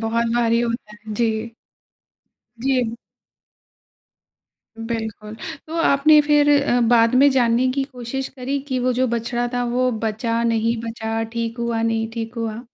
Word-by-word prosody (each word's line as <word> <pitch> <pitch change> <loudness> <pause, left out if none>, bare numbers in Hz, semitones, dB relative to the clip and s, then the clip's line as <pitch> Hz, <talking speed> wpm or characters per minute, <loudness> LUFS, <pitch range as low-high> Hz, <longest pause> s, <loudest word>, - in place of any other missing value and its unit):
बहुत 230 +1 0
भारी 235 -1 +2
होता 235 -2 -3
है, 215 0 -9
जी। 225 0 -1 1.1
जी। 250 -2 0 1.8
बिल्कुल। 220 -2 -5 0.3
तो 320 - -7
आपने 300 +1 +5
फिर 295 0 +3
अ, 245 -3 +2
बाद 230 0 +4
में 275 +3 +6
जानने 245 -1 +2
की 275 0 -1
कोशिश 265 0 -5
करी 270 +1 -3
कि 260 -2 -1
वो 250 0 +1
जो 255 +1 +1
बछड़ा 240 +1 -1
था, 245 0 0
वो 250 +1 +1
बचा, 230 +2 -1
नहीं 230 0 +1
बचा? 225 0 -3
ठीक 230 0 -3
हुआ, 235 -1 -1
नहीं 225 -1 0
ठीक 225 0 -5
हुआ? 225 -1 -4
235 Hz, 145 wpm, -21 LUFS, 225-255 Hz, 1.8 s, में